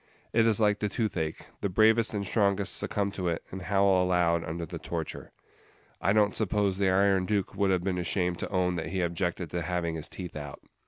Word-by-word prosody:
It 115 0 +4
is 110 -2 +2
like 105 -2 +3
the 105 - -1
toothache; 90 -8 -2 0.2
the 100 - 0
bravest 110 +4 +4
and 100 -1 -2
strongest 100 -2 +1
succumb 100 -1 0
to 95 -2 -3
it, 85 -1 -1
and 95 - -6
howl 95 0 +3
aloud 85 -2 +2
under 85 +1 -4
the - - -7
torture. - - -5 0.7
I 95 - +2
don't 105 -1 +3
suppose 100 -2 +1
the 95 -1 +3
Iron 95 -1 +3
Duke 105 -3 0
would 100 -1 +1
have 90 -2 +1
been 90 -1 -1
ashamed 90 0 -1
to - - -4
own 90 -2 0
that 80 - -3
he 95 +1 -1
objected 85 -1 -2
to 90 - -2
having 85 -1 -2
his 80 -2 -4
teeth 90 -2 -7
out. 75 -2 -7
95 Hz, 210 wpm, -28 LUFS, 90-100 Hz, 0.7 s, It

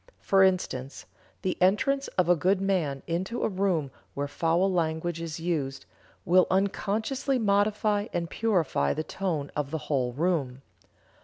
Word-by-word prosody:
For 195 0 +3
instance, 175 -8 0 0.4
the 185 -1 -2
entrance 275 +9 +2
of 180 -2 +3
a 175 - +5
good 185 +4 +2
man 175 -9 -1
into 185 +8 -2
a - - +3
room 185 -8 0 0.2
where 145 0 -2
foul 170 +6 +1
language 165 0 -1
is 165 -1 -5
used, 150 -6 -2 0.4
will 185 0 +5
unconsciously 215 +7 0
modify 210 -1 +1
and 170 -1 -2
purify 175 - 0
the 155 - -2
tone 160 -4 -3
of 150 -2 -2
the 160 - -2 0.2
whole 125 -3 +1
room. 140 -4 -1
180 Hz, 145 wpm, -27 LUFS, 155-195 Hz, 0.4 s, a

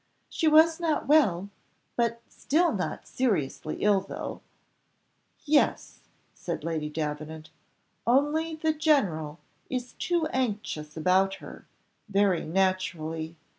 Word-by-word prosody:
"She 320 - 0
was 320 +2 +6
not 325 -3 0
well, 200 - +3 0.4
but 235 -1 0
still 335 +4 +1
not 185 -4 -4
seriously 165 - -1
ill, 205 -2 +4
though 195 - -6 0.5
" - - -45
"Yes," 295 -1 +1 0.3
said - - -5
Lady 160 -2 -2
Davenant; 155 +1 -5 0.6
"only 295 +6 +2
the 315 0 0
general 200 - +1 0.3
is 250 -1 -4
too 345 -3 0
anxious 205 -11 -2
about 190 +4 +3
her - - -12 0.4
very 195 -3 +2
naturally. 165 -3 -1
200 Hz, 110 wpm, -27 LUFS, -, 0.6 s, was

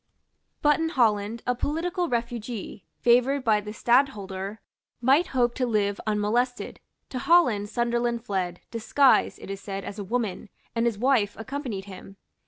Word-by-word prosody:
But 295 0 +4
in 325 0 0
Holland 225 -5 +1
a 250 - +2
political 340 +7 -2
refugee, 235 -3 -4 0.2
favoured 250 +3 +3
by 215 -3 +3
the 210 0 -7
Stadtholder, 210 -5 0 0.4
might 270 +8 +4
hope 245 -2 +1
to 250 0 -1
live 205 -3 0
unmolested. 220 +4 0 0.3
To 255 - -4
Holland 250 -10 +3
Sunderland 235 0 -1
fled, 185 -4 -2
disguised, 255 +4 +3
it - - -8
is 195 0 -6
said, 195 -1 -5
as 205 - -7
a - - -3
woman; 210 -2 -3 0.3
and 230 +1 +2
his 230 -3 -1
wife 235 -4 +2
accompanied 225 -4 -5
him. 195 0 -11
235 Hz, 150 wpm, -26 LUFS, 205-255 Hz, 0.4 s, But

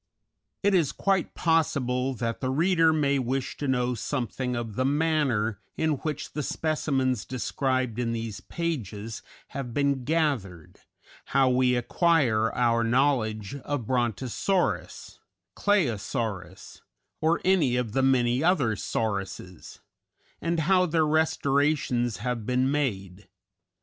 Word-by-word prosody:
_" - - -58 0.6
It 200 0 +3
is 165 -7 +3
quite 195 -2 0
possible 135 -6 +1
that 115 -1 -3
the 130 - -1
reader 165 +3 +3
may 140 -3 +2
wish 130 +1 -2
to 145 - -3
know 125 -1 +1
something 125 +1 -3
of 115 -2 -4
the 130 - 0
manner 135 -8 +1 0.2
in 160 0 +1
which 150 +1 -5
the 150 - -2
specimens 135 -6 -1
described 130 -2 -2
in 120 -1 0
these 115 -2 -4
pages 115 - -4 0.3
have 130 -4 -6
been 140 -2 +1
gathered, 125 - -1 0.6
how 135 -1 +5
we 125 0 +3
acquire 120 -4 +2
our 115 -1 +2
knowledge 115 -4 +1
of 140 -2 -4
Brontosaurus, 120 - -1 0.4
Claosaurus, 110 - -1 0.4
or 160 +2 +2
any 170 -10 +3
of 125 -3 -1
the 135 +4 +1
many 130 0 +2
other 145 - +2
"sauruses," 100 -2 -4 0.6
and 170 0 0
how 180 +3 +3
their 160 -1 +2
restorations 145 -5 +1
have 120 +1 -3
been 130 +1 +1
made. 100 -9 -2
130 Hz, 125 wpm, -27 LUFS, 115-150 Hz, 0.6 s, how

